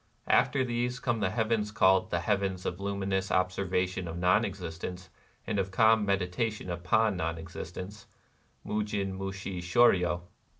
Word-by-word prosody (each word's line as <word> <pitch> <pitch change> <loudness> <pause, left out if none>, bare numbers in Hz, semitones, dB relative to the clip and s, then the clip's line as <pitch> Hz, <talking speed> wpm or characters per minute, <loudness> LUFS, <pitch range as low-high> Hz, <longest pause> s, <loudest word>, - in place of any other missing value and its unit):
After 135 - +3
these 125 +1 -1
come 120 -4 -1
the 100 - +1
heavens 110 0 0
called 95 -2 +4
the 85 - 0
Heavens 95 -1 -1
of 90 - -3
Luminous 100 -1 -1
Observation 90 0 0
of 85 +1 -5
Non 90 +5 +3
Existence 90 -2 -6 0.4
and 105 -2 -1
of 95 0 -1
Calm 110 +2 +4
Meditation 100 +1 -1
upon 95 +5 +2
Non 80 -1 -2
Existence 90 +4 -8 0.6
QMujin 105 -2 -2
musJii 95 -1 -5
sJioryo). 90 -2 +3
95 Hz, 135 wpm, -29 LUFS, 90-105 Hz, 0.6 s, called